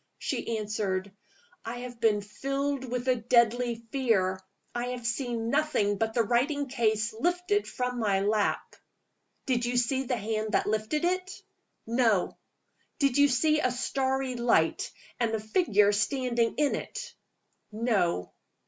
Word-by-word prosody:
She 230 - -2
answered. 205 -2 -2 0.5
"I 240 +2 -5
have 245 -1 -8
been 215 -3 +3
filled 275 +5 -2
with 250 0 -3
a 255 -1 +3
deadly 235 +1 +3 0.2
fear. 195 -8 +1 0.3
I 240 0 -2
have 250 -1 -5
seen 230 -1 -1
nothing 245 -10 +1
but 220 0 -1
the 235 - +4
writing 275 +6 +1
case 225 -3 +1
lifted 355 - 0
from 250 -1 -3
my 200 -4 +1
lap." 210 +1 0 0.7
"Did 250 -2 +1
you 245 +1 0
see 255 +2 +2
the 250 0 -1
hand 215 0 -2
that - - +2
lifted 215 +10 0
it?" 370 +1 0 0.5
"No." 225 -5 +2 0.6
"Did 275 -1 +2
you 285 - +7
see 305 +4 +2
a 255 - +2
starry 265 +1 -1
light, 235 -10 +1 0.3
and 230 -2 +1
a - - -2
figure 215 - +3
standing 235 +3 0
in 295 -1 +2
it?" - - -5 0.6
"No." 210 - 0
240 Hz, 140 wpm, -28 LUFS, 215-265 Hz, 0.7 s, you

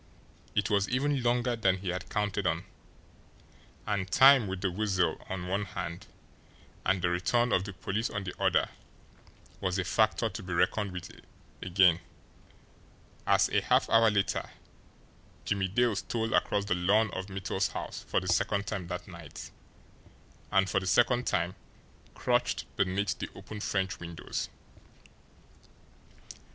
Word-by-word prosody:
It 105 +1 +1
was 100 -1 +2
even 135 +2 +1
longer 120 0 +1
than 95 -5 +2
he 95 0 -5
had 90 +1 -4
counted 105 -2 -1
on, - - 0 1.2
and 100 -3 -1
time, 135 -3 +7
with 95 -1 -4
the 95 -2 0
Weasel 95 -4 0
on 90 -1 -4
one 100 +3 0
hand 85 -2 -6 0.8
and 90 -1 +1
the 85 - +3
return 120 +8 +1
of 95 - +2
the 100 - -6
police 95 +5 -2
on 105 -1 -4
the 90 - -5
other, - - +3 0.9
was 95 -1 -1
a 95 - 0
factor 110 +5 +2
to 105 0 -6
be 90 -2 -5
reckoned 100 +3 +1
with 90 -2 -8 0.4
again, 90 -2 +4 1.3
as, - - +5
a - - +2
half - - +3
hour 115 0 +6
later, 100 -2 0 1.0
Jimmie 100 -2 0
Dale 115 +3 +2
stole 115 +4 -2
across 100 -1 +2
the 105 - +1
lawn 100 +4 +2
of 95 +1 -5
Mittel's 95 0 -1
house - - -6
for - - +2
the - - -7
second 100 0 +1
time 100 -4 -4
that 90 +1 -5
night, 85 -5 -10 1.0
and 95 0 +4
for 100 - +1
the 95 - -6
second 120 +6 +3
time 85 +1 0 0.6
crouched - - 0
beneath 100 +1 0
the - - -4
open 105 - -8
French 95 -2 -1
windows. 85 -1 -5
95 Hz, 145 wpm, -30 LUFS, 90-110 Hz, 1.3 s, time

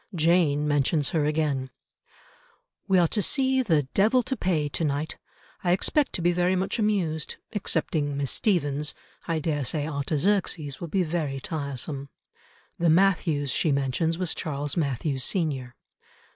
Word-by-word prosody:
Jane 160 -3 +3
mentions 145 0 +2
her 155 -3 +1
again— 150 -4 0 1.2
"We 190 -2 +4
are 175 -2 +5
to 210 - 0
see 265 - +2
the 160 - +2
Devil 225 +6 +4
to 265 - -2
Pay 170 - 0
to 145 - -3
night. 150 +1 -2 0.4
I 175 -1 +3
expect 280 +9 +1
to 175 - -2
be 175 - +4
very 180 +1 +2
much 190 +4 -1
amused. 180 -8 0 0.2
Excepting 155 -7 -1
Miss 140 -2 -1
Stephens, 150 -7 0 0.3
I 165 -1 0
daresay 150 -1 -1
Artaxerxes 155 +1 -1
will 170 - -4
be 185 +3 +1
very 155 -5 -2
tiresome." 140 -1 -4 0.7
The 170 -1 +3
Mathews 160 -5 +3
she 155 - +1
mentions 140 +4 0
was 180 -2 0
Charles 145 -1 -3
Mathews 140 -3 -1
senior. 135 -9 -1
160 Hz, 145 wpm, -26 LUFS, 145-180 Hz, 1.2 s, are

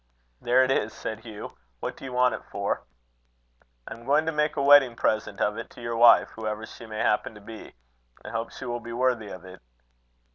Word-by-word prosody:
"There 125 +2 +4
it 130 - +1
is," 110 -4 0
said 110 - -5
Hugh. 110 -2 -9 0.3
"What - - -4
do - - -14
you 130 - -6
want 125 -1 +3
it - - -6
for?" - - -2 1.1
"I - - -6
am 115 - -13
going 150 +3 +3
to 160 - 0
make 150 0 0
a 145 - 0
wedding 140 -4 +7
present 110 -3 -1
of 105 +2 0
it 115 - -7
to - - -14
your 115 0 -3
wife, 115 0 +7
whoever 110 0 -5
she 115 - -12
may 110 -1 -7
happen 105 0 +1
to - - -11
be. 110 - -11 0.5
I - - -6
hope 115 0 -3
she - - -9
will 120 -1 -3
be 115 0 -8
worthy 120 -3 0
of 95 -2 -9
it." 95 +1 -12
115 Hz, 220 wpm, -26 LUFS, 110-130 Hz, 1.1 s, wedding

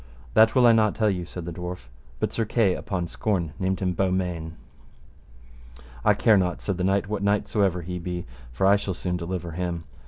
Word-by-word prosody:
That 110 +2 +5
will 125 -2 +6
I 120 - +8
not 110 -2 +3
tell 110 -2 +2
you, 90 -2 -3
said 90 -1 -7
the 85 - -5
dwarf, 90 -6 -6 0.3
but - - -1
Sir 115 - 0
Kay 105 -3 +2
upon 90 -2 -3
scorn 85 -5 -2
named 95 0 -1
him 90 -1 0
Beaumains. 90 -3 -1 1.5
I - - +4
care 110 -3 +4
not, 90 -2 0
said 100 -3 -3
the 90 - -2
knight, 100 +1 +1
what 105 -1 -3
knight 100 0 +1
so 105 - 0
ever 90 -3 +1
he 90 +1 -4
be, 90 0 -4 0.3
for - - 0
I 100 +1 +6
shall 100 -2 -4
soon 90 0 -2
deliver 85 0 -4
him. 85 0 -3
90 Hz, 210 wpm, -25 LUFS, 90-100 Hz, 1.5 s, I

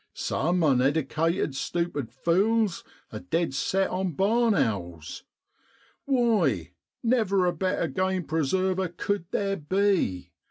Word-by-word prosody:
Some 175 +5 0
uneddicated, 150 +4 +1
stupid 145 -2 -2
fules 195 - +1 0.3
are - - -6
dead 165 -3 -1
set 190 +8 0
on 185 -1 -2
barn 220 +6 +2
owls. 85 - -3 0.8
Why, 205 - +1 0.3
never 215 -6 +2
a 175 - +1
better 185 -3 -1
game 185 +5 -1
preserver 185 +5 0
cud 175 +2 -3
theer 195 -1 -1
be. 185 - 0
175 Hz, 110 wpm, -26 LUFS, 145-195 Hz, 0.8 s, barn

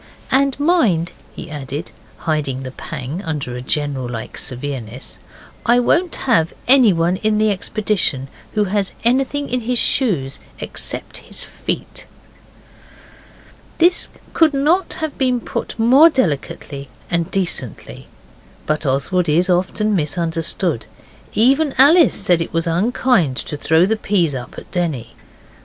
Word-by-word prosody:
'And 275 +1 +2
mind,' 235 - +2 0.2
he 165 - -8
added, 145 +2 -5 0.3
hiding 145 -5 -2
the 130 - -6
pang 135 +6 -6
under 150 -8 -4
a 125 - -5
general 135 -2 -2
like 115 -2 -6
severeness, 125 -3 -5 0.5
'I 240 +1 +5
won't 340 +7 +1
have 170 -11 +2
anyone 190 -10 +5
in 215 +1 +1
the 215 0 +3
expedition 195 - 0 0.3
who 210 - +3
has 200 0 -1
anything 270 +4 +1
in 250 0 -1
his 245 +2 -1
shoes 150 - +1 0.2
except - - -4
his - - -7
feet.' - - -4 1.7
This 350 +2 +3 0.2
could 315 -3 +3
not 330 +7 +1
have 315 -2 -4
been 255 -2 +2
put - - -5
more 260 +8 +7
delicately 145 - -2 0.2
and 170 -1 +1
decently. 190 -3 -3 0.6
But 155 -1 -1
Oswald 150 +7 +1
is 175 +5 +3
often 200 +4 +1
misunderstood. 165 - -1 0.5
Even 270 +6 +3
Alice 315 +5 +6
said 180 -4 +2
it 165 - -3
was 165 0 0
unkind 180 - +1
to 150 - -4
throw 160 +3 +3
the 220 +3 0
peas 180 -8 +1
up 125 -2 -7
at - - -11
Denny. 155 -10 -2
180 Hz, 130 wpm, -19 LUFS, 150-245 Hz, 1.7 s, more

